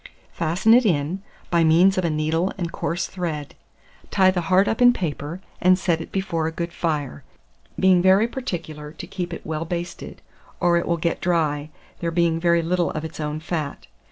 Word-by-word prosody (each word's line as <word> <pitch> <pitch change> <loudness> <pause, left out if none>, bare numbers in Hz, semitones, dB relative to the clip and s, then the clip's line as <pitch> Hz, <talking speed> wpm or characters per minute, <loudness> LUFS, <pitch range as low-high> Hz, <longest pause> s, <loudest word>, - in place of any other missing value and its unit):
Fasten 175 +7 +2
it 250 +2 +6
in, 170 -1 0 0.3
by 170 -1 +4
means 170 +4 +5
of 185 - 0
a 170 - +1
needle 160 +4 0
and 170 -3 -3
coarse 175 +2 -2
thread; 165 -6 -4 0.6
tie 190 -2 +4
the 180 -1 -1
heart 190 +2 +4
up 225 - -1
in 245 0 +7
paper, 165 -2 -4 0.2
and 185 0 +5
set 170 -3 0
it - - -9
before 180 -5 -1
a - - -2
good 170 +1 -4
fire, 150 - -2 0.6
being 185 -1 +5
very 190 +4 +5
particular 165 - -6
to 175 - -8
keep 180 -1 -5
it 170 - -7
well 160 0 -3
basted, 175 +1 -6 0.4
or 175 -1 +3
it 170 - 0
will 170 - +1
eat 170 - 0
dry, 155 -4 0 0.3
there 170 - -1
being 165 -1 +1
very 170 0 +3
little 175 +1 +1
of 155 +1 -4
its 160 - -8
own 150 0 -3
fat. 155 -3 -4
170 Hz, 190 wpm, -23 LUFS, 160-185 Hz, 0.6 s, in